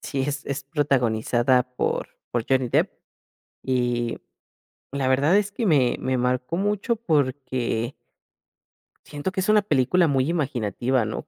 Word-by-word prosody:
sí, 140 - -3
es 145 +2 -3
es 140 0 -3
protagonizada 125 -3 +1
por 125 -1 -2 0.2
por 120 -2 -1
Johnny 130 -2 +2
Depp, - - +2 0.7
y 120 -2 0 0.7
la 135 -1 -1
verdad 140 +8 +4
es 205 0 0
que 235 - -2
me 140 - +3
me 130 -1 0
marcó 125 +5 -1
mucho 210 +4 0
porque 130 - -1 1.1
siento 145 +5 -4
que 190 - -1
es 190 - -2
una 215 -1 +5
película 165 +1 +2
muy 135 0 +1
imaginativa, 130 - 0
¿no? 110 - -4
135 Hz, 140 wpm, -24 LUFS, 125-155 Hz, 1.1 s, una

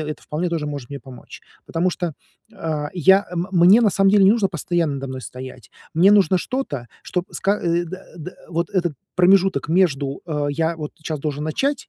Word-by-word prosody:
это 150 - -7
вполне 170 +4 -2
тоже 165 -3 -2
может 145 -4 -6
мне 140 - -5
помочь. 130 -3 -13 0.2
Потому 175 +3 0
что, 175 -3 -3 0.4
э, 160 -7 -3
я 190 +4 +4
м 175 +2 -2
мне, 185 +6 +6
на 215 - +4
самом 195 +1 +3
деле, 200 -1 +5
не 195 - +7
нужно 215 -4 +2
постоянно 170 -2 -1
надо 135 0 -5
мной 130 0 -6
стоять. 125 -3 -10 0.2
Мне 180 +5 +6
нужно 195 -2 +4
что-то, 175 - -4 0.2
чтоб 180 -1 -3
ска 200 +2 0
э, 170 0 0
да, 185 +3 -8
да, 170 +2 -7 0.2
вот 170 +2 -2
этот 175 -5 0 0.2
промежуток 185 -4 +3
между, 145 -6 +1
э, 150 -3 -2
"я 165 +3 -1
вот 150 -2 -6
щас 155 -2 -3
должен 150 0 -3
начать", 270 - -1
170 Hz, 195 wpm, -21 LUFS, 150-190 Hz, 0.4 s, не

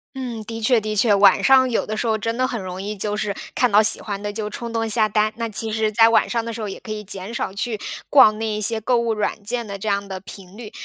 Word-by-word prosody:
嗯， 245 -4 -5
的 225 +1 -7
确 235 +1 +3
的 215 0 -4
确。 210 0 +3
晚 200 -1 +5
上 265 -1 +5
有 230 - -1
的 215 - -4
时 240 - -2
候 220 -1 0
真 230 +2 -3
的 255 0 +1
很 240 -4 -4
容 185 0 -6
易， 210 +1 -4
就 210 +1 -2
是 210 -2 -2 0.2
看 250 -2 +2
到 205 +1 +6
喜 220 - +5
欢 200 -2 -6
的 205 0 -4
就 210 0 -4
冲 235 +3 -6
动 225 0 -1
下 215 0 +2
单。 215 +1 +1
那 230 -1 -3
其 220 +1 -1
实 220 0 0
在 225 +1 +5
晚 230 - +2
上 230 -2 -2
的 230 - -5
时 225 - -6
候， 210 - -4
也 - - -8
可 225 - -9
以 210 0 -5
减 195 +2 -7
少 215 - -3
去 215 +2 -4 0.3
逛 240 -7 +6
那 225 0 -3
一 210 -1 -3
些 225 +2 +3
购 245 +3 0
物 235 -1 0
软 210 0 -3
件 235 +3 -2
的 200 -2 -7
这 215 - -6
样 200 0 -1
的 190 -1 -6
频 190 0 -11
率。 220 -1 -10
215 Hz, 315 characters per minute, -21 LUFS, 205-230 Hz, 0.3 s, 到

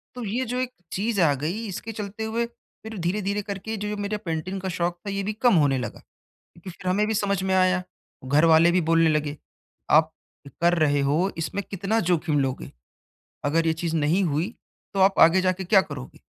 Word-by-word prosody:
तो 245 - -5
ये 240 +6 -1
जो 250 +2 -3
एक 255 0 -2 0.2
चीज़ 210 +2 -1
आ 150 -4 +4
गई 180 +9 -2
इसके 205 +4 -6
चलते 210 +1 -5
हुए 230 +2 -1
फिर 220 -2 -13
धीरे-धीरे 200 +4 -1
करके 200 +2 -5
जो 210 +1 -4
ये 210 - -3
मेरे 205 +1 -3
पेंटिंग 185 0 -4
का 190 - -3
शौक़ 175 0 -1
था - - -1
ये 200 0 -2
भी 210 +2 -2
कम 230 -1 +3
होने 140 -4 +3
लगा 125 - -5
क्योंकि 170 +2 -17
फिर 185 +1 -5
हमें 205 +3 +2
भी 220 - 0
समझ 200 -2 0
में 190 0 0
आया, 185 0 +3 0.4
घरवाले 160 +4 +5
भी 180 0 +2
बोलने 165 -1 +4
लगे, 150 -1 -1 0.5
आप 155 +1 +5 0.5
कर 175 +1 +4
रहे 145 -2 +3
हो 175 +7 +1
इसमें 180 +5 -3
कितना 200 +4 0
जोखिम 155 -4 +1
लोगे, 130 -1 -2 0.7
अगर 165 +3 +1
ये 160 - +3
चीज़ 165 0 -3
नहीं 160 +6 +2
हुई 160 +4 0 0.4
तो 195 - -2
आप 190 0 +4
आगे 170 +3 +6
जाके 185 0 0
क्या 195 0 +5
करोगे? 140 -6 -9
185 Hz, 200 wpm, -25 LUFS, 160-205 Hz, 0.7 s, आगे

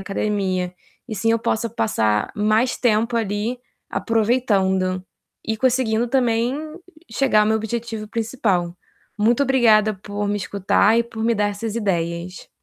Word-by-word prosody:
academia. 195 -3 -2 0.3
E - - -6
assim 220 +2 0
eu 230 - +3
possa 230 0 -1
passar 110 - 0
mais 215 +4 +1
tempo 230 0 +1
ali, 220 +3 -2 0.3
aproveitando 195 -6 +1 0.4
e 220 0 -1
conseguindo 240 -2 +1
também 240 -1 +1 0.6
chegar 265 -6 +3
ao - - +1
meu 220 0 +2
objetivo 220 -1 -4
principal. 210 -7 -1 0.4
Muito 230 +6 +3
obrigada 220 -5 +4
por 205 +1 -5
me 205 - 0
escutar 205 +2 +2
e 235 - +2
por 225 -1 -7
me 230 +1 +2
dar 210 -1 +1
essas 215 +2 -5
ideias. 175 -3 -3
215 Hz, 140 wpm, -21 LUFS, 200-230 Hz, 0.6 s, obrigada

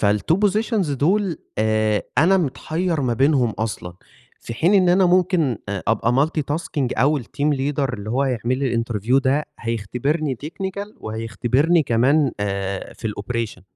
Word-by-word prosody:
فالtwo 105 +9 +2
positions 210 - 0
دُول 175 +5 +1 0.2
آآ 110 -1 +1 0.2
أنا 180 +6 +5
متحيّر 165 +1 -1
ما 125 -3 0
بينهم 135 -2 +3
أصلًا 105 -5 -5 0.5
في 115 - -7
حين 175 - +2
إن 185 -2 +4
أنا 185 +1 +4
ممكن 175 - +2
أ 100 -2 -3
أبقى 120 +6 +2
multi 160 -1 -3
tasking 145 -5 -2
أو 145 +1 +3
الteam 140 +6 -2
leader 135 -1 -1
اللي 105 -1 -5
هو 135 +3 +1
هيعمل 125 -1 -1
لي 135 -3 -1
الinterview 115 +2 +1
ده، 140 +3 +1 0.2
هيختبرني 125 +6 -2
technical 195 +4 -5
وهيختبرني 120 +9 +1
كمان 135 +4 +2
آآ 100 -1 -3
في 110 - -4
الoperation. 105 -2 -4
135 Hz, 150 wpm, -21 LUFS, 115-160 Hz, 0.5 s, أنا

